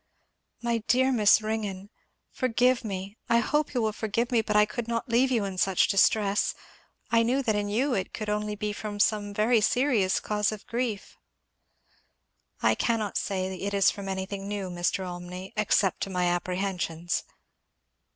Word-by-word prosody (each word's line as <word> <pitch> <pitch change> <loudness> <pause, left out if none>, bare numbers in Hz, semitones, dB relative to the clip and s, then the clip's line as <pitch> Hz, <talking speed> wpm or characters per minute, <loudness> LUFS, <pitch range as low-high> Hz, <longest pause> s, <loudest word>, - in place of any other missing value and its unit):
"My 235 -1 +1
dear 260 +2 +3
Miss 215 -3 +5
Ringgan! 205 -2 -4 0.4
forgive 250 0 +2
me 200 0 -5
I 235 - +5
hope 295 +4 0
you 240 - +1
will 215 -1 0
forgive 225 +3 -2
me, 235 -2 +3
but 210 -1 -2
I 210 0 +6
could 225 +2 -5
not 230 +2 -2
leave 245 +3 +3
you 230 -5 +1
in 190 -2 -5
such 190 -1 +3
distress. 200 +1 +2 0.6
I 230 0 +5
knew 255 +4 +1
that 220 -4 +1
in 205 0 -1
you 255 +6 +1
it 190 -5 -2
could 215 - -5
only 210 0 -1
be 210 0 -3
from 205 0 -6
some 205 0 +1
very 215 +3 +2
serious 230 -5 +2
cause 210 -1 0
of 215 -2 -8
grief." 230 -4 -3 1.5
"I - - +5
cannot 220 -4 -1
say 190 -1 -1
it 200 0 -2
is 195 - +4
from 200 -2 -7
anything 195 +1 -4
new, 200 -3 -4
Mr. 175 +2 -1
Olmney 180 +1 -7
except 205 -3 +1
to - - -2
my 180 -1 0
apprehensions." 175 -1 -1
210 Hz, 170 wpm, -27 LUFS, 195-230 Hz, 1.5 s, I